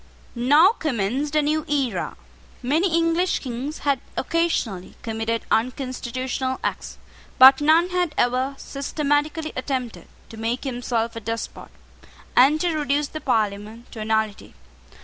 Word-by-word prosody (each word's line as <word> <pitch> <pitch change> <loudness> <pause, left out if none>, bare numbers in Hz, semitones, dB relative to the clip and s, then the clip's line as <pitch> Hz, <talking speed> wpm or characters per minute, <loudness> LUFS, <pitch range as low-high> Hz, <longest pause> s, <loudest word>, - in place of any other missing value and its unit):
Now 290 +9 +5
commenced 285 - -2
a 305 - +4
new 305 +1 0
era. 260 -11 -1 0.5
Many 320 +9 +1
English 335 +2 +2
Kings 265 +4 -5
had 280 -2 +2 0.2
occasionally 265 - -1
committed 225 0 -2
unconstitutional 255 +1 -2
acts: - - -4 0.4
but 265 +2 +9
none 320 +4 +4
had 355 -4 0
ever 255 +3 +1
systematically 295 +2 -2
attempted 255 -3 -4 0.2
to 225 - -11
make 230 +3 -2
himself 240 -3 -2
a - - -4
despot, 225 +1 -5 0.7
and 280 +5 +6
to 345 -3 0
reduce 290 -1 0
the 310 - -7
Parliament 215 -1 -2
to 225 - -9
a 215 - -4
nullity. 220 -1 -1
260 Hz, 130 wpm, -23 LUFS, 230-300 Hz, 0.7 s, but